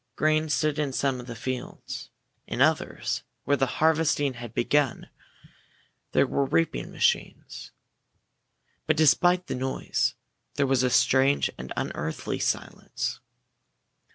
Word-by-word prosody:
Grain 155 0 +2
stood 150 +1 +1
in 145 -2 0
some 135 -1 0
of 125 - -9
the 120 - -6
fields. 125 +2 -6 0.4
In - - -4
others, - - +1 0.2
where 145 - +2
the 135 -1 +1
harvesting 155 -3 +2
had 120 -2 -8
begun, 140 +3 0 1.0
there - - +4
were 140 - 0
reaping 85 -8 0
machines. - - -1 1.2
But 155 0 +2
despite 175 +4 +4
the - - -4
noise, 130 +1 -1 0.4
there 140 - +2
was 135 -2 +2
a 130 - +2
strange 135 +3 +3
and 65 +1 -8
unearthly 80 +2 -3
silence. - - -3
140 Hz, 125 wpm, -26 LUFS, 125-155 Hz, 1.2 s, there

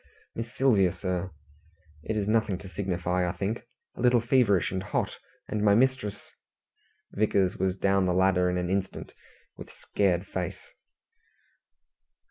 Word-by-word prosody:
"Miss 115 +1 -5
Sylvia, 120 -9 +3
sir. 90 -1 -3 0.7
It 110 +7 -3
is 100 -1 -1
nothing 110 -3 +1
to 95 - -11
signify, 90 -1 -1
I - - -3
think. 105 +4 -3 0.3
A - - -7
little 125 -1 +5
feverish 115 -5 +2
and 95 0 -2
hot, - - -2 0.3
and 105 - -2
my 100 -1 +5
mistress 125 -4 0 0.4
" - - -42
Vickers 100 -3 +1
was 95 -1 0
down 95 -1 +2
the 90 - +2
ladder 95 -1 +3
in 90 - -1
an 90 0 -2
instant, 95 0 -3 0.4
with - - -10
scared 95 -2 0
face. 90 -3 -6
95 Hz, 145 wpm, -28 LUFS, 90-110 Hz, 0.7 s, little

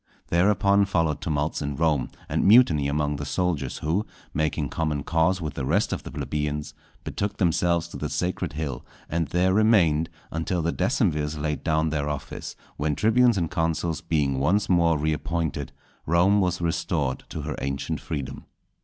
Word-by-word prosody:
Thereupon 100 +3 +3
followed 80 -6 0
tumults 75 -3 -1
in 70 -1 -3
Rome, 75 -2 +1 0.2
and - - 0
mutiny 95 - +6
among 75 0 0
the - - -5
soldiers, 80 -8 -1
who, 90 +8 -1 0.3
making 75 -1 -1
common 75 -3 -1
cause 85 +4 +2
with 75 -3 -4
the 70 - -4
rest - - +1
of - - -3
the - - -8
plebeians, 75 0 -3 0.3
betook 100 0 -3
themselves 85 -1 +2
to - - -8
the - - -3
Sacred 90 -3 -2
Hill, 75 -5 -4 0.3
and 85 0 0
there 90 +2 +2
remained 90 -7 +4 0.2
until 85 +1 -1
the 85 - 0
decemvirs 85 - 0
laid 75 0 -2
down 80 -1 +1
their 75 -1 -1
office; 75 -2 -6 0.2
when 75 0 0
tribunes 115 - +4
and 85 -3 -1
consuls 80 0 -1
being 75 -6 0
once 100 +9 +2
more 85 -3 +3
appointed, 80 -2 -2 0.4
Rome 90 +5 +4
was 90 -1 0
restored 80 -5 -1
to 75 - -5
her 75 -2 -3
ancient 70 0 -2
freedom. 70 -3 -5
80 Hz, 160 wpm, -25 LUFS, 75-90 Hz, 0.4 s, mutiny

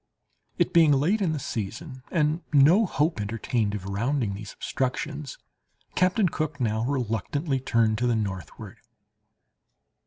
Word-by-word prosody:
It - - +1
being 160 -3 +6
late 170 +11 +2
in 180 -5 +1
the 155 - -1
season, 130 - -5
and 155 0 +1
no 160 +9 +5
hope 150 -7 0
entertained 110 0 -1
of 95 -2 -6
rounding 115 +3 -1
these 100 +1 -7
obstructions, 140 +2 -3 0.6
Captain 185 +2 +3
Cook 155 -3 -3
now 110 -2 0
reluctantly 135 +3 -1
turned 115 -4 +1
to 125 - +1
the 120 - +2
northward. 95 -5 -5
135 Hz, 130 wpm, -26 LUFS, 110-155 Hz, 0.6 s, being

